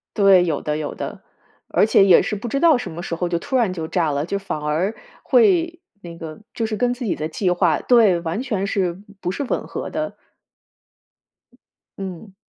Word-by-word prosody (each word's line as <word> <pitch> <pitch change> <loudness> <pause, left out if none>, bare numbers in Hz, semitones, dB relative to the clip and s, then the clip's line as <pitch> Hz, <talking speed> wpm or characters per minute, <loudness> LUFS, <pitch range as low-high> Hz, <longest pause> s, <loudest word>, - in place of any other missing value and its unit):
对， 195 -4 +6
有 155 -4 -1
的， 150 0 -2
有 155 -1 -4
的， - - -6 0.5
而 - - +3
且 205 -2 +5
也 185 -3 +7
是 210 - -2
不 230 - -6
知 255 - -1
道 325 -5 +6
什 245 - -5
么 170 +2 -7
时 170 - -3
候 175 +1 -2
就 170 -1 0
突 260 +9 -1
然 220 -7 +1
就 165 -3 -4
炸 160 -2 0
了， 145 +1 -1
就 200 +3 -2
反 190 -6 -5
而 160 +8 -1 0.3
会 350 -7 +3 0.2
那 170 -2 -9
个 160 -2 -8
就 230 - -2
是 220 -1 -3
跟 245 +1 +1
自 245 +1 -7
己 210 - -1
的 155 - -3
计 180 +3 -1
划 175 -4 +2
对， 215 -8 +4
完 170 +6 -3
全 215 -7 -2
是 185 -4 -1 0.2
不 180 - -3
是 190 +10 -2
吻 265 - -2
合 - - -5
的。 310 0 -4 1.8
嗯。 190 +1 -7
190 Hz, 220 characters per minute, -21 LUFS, 170-230 Hz, 1.8 s, 也